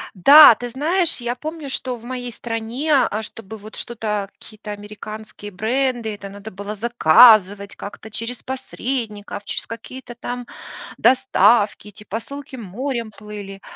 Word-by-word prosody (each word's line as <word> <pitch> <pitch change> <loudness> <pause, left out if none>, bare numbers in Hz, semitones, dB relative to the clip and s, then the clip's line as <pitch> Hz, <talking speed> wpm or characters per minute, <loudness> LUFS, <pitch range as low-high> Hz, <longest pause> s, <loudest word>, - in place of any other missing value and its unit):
Да, 280 - +9
ты 245 +2 -6
знаешь, 325 +8 0
я 240 0 -2
помню, 310 +1 -7
что 255 -1 -3
в 230 - -15
моей 245 -1 -5
стране, 235 +6 -3
а, 220 -5 +2
чтобы 220 0 -9
вот 215 +2 -12
что-то, 210 -4 -3
какие-то 215 -1 -11
американские 210 0 -8
бренды, 230 +2 -1
это 200 -1 -9
надо 200 +2 -10
было 200 +2 -6
заказывать 210 -2 +5
как-то 210 +1 -10
через 230 +2 -5
посредников, 235 -6 -5
через - - -4
какие-то 240 +2 -9
там 245 +1 -6 0.5
доставки, 240 -5 +3
эти 210 +1 -13
посылки 260 +6 -7
морем 235 +2 -4
плыли 205 -2 -9
225 Hz, 135 wpm, -21 LUFS, 210-250 Hz, 0.5 s, Да